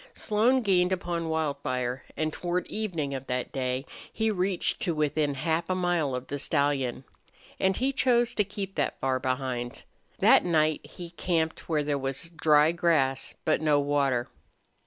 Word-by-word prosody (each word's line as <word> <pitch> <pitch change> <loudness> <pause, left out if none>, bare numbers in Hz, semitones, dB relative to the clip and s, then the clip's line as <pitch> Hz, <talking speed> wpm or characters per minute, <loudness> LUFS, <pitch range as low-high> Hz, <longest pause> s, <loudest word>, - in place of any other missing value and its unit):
Slone 235 +5 +2
gained 180 -3 +3
upon 175 -3 -2
Wildfire, 130 -5 -2
and 155 -1 -1
toward 175 0 -2
evening 170 -10 -3
of 135 0 -6
that 125 0 -2
day 130 0 -2 0.3
he 220 0 0
reached 190 +1 0
to 175 -8 0
within 150 -1 0
half 160 +5 -1
a 185 - +1
mile 175 -7 0
of 125 0 -5
the 145 +2 -5
stallion. 140 -4 0 0.6
And 190 0 +2
he 265 +2 +1
chose 240 -3 +2
to 210 - +2
keep 200 -1 -6
that 145 - -1
far 130 -1 0
behind. 130 -2 -3 0.3
That - - +6
night 155 -3 +2
he 175 -2 -10
camped 165 -2 -2
where 155 -2 +1
there 145 -1 -1
was 135 +5 -3
dry 155 -1 +4
grass, 155 -6 +1
but 155 - +2
no 150 -2 +3
water. 140 -4 +1
155 Hz, 160 wpm, -28 LUFS, 135-180 Hz, 0.6 s, That